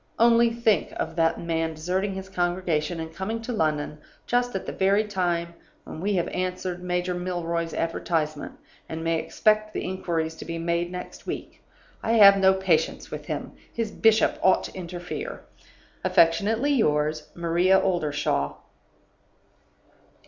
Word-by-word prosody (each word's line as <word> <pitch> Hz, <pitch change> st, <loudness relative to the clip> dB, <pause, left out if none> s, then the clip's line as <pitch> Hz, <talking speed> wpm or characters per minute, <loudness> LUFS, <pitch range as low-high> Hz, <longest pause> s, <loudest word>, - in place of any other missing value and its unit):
Only 235 Hz, 0 st, +5 dB
think 230 Hz, -3 st, +1 dB
of 165 Hz, -, -3 dB
that 165 Hz, -1 st, +2 dB
man 165 Hz, -1 st, -1 dB
deserting 185 Hz, +5 st, -1 dB
his 190 Hz, 0 st, -6 dB
congregation, 175 Hz, -3 st, -1 dB
and 160 Hz, 0 st, -6 dB
coming 190 Hz, +6 st, -3 dB
to 245 Hz, -, -4 dB
London 150 Hz, -5 st, -1 dB, 0.3 s
just 245 Hz, -1 st, 0 dB
at 190 Hz, -, -3 dB
the -, -, -4 dB
very 200 Hz, +2 st, +2 dB
time 175 Hz, -4 st, -1 dB, 0.3 s
when 155 Hz, -, -8 dB
we 205 Hz, +2 st, 0 dB
have 175 Hz, -2 st, +1 dB
answered 180 Hz, -1 st, -3 dB
Major 180 Hz, 0 st, -1 dB
Milroy's 170 Hz, -2 st, -2 dB
advertisement, 160 Hz, -2 st, -2 dB, 0.4 s
and 160 Hz, 0 st, -5 dB
may 165 Hz, 0 st, +1 dB
expect 215 Hz, +4 st, +1 dB
the -, -, -2 dB
inquiries 170 Hz, -3 st, -2 dB
to -, -, -7 dB
be 165 Hz, 0 st, -4 dB
made 170 Hz, +1 st, -1 dB
next 180 Hz, 0 st, -8 dB
week! -, -, -6 dB, 0.4 s
I 225 Hz, -, 0 dB
have 200 Hz, -3 st, +8 dB
no 190 Hz, 0 st, +5 dB
patience 175 Hz, -4 st, 0 dB
with -, -, -7 dB
him; -, -, -4 dB, 0.2 s
his 230 Hz, -2 st, -3 dB
bishop 220 Hz, 0 st, +3 dB
ought 190 Hz, -, +4 dB
to -, -, -7 dB
interfere. 180 Hz, -, -6 dB, 0.6 s
"Affectionately 215 Hz, -, +3 dB
yours, 150 Hz, -, +1 dB
"MARIA 175 Hz, +3 st, +3 dB
OLDERSHAW." 145 Hz, -, 0 dB
180 Hz, 145 wpm, -25 LUFS, 165-195 Hz, 0.6 s, have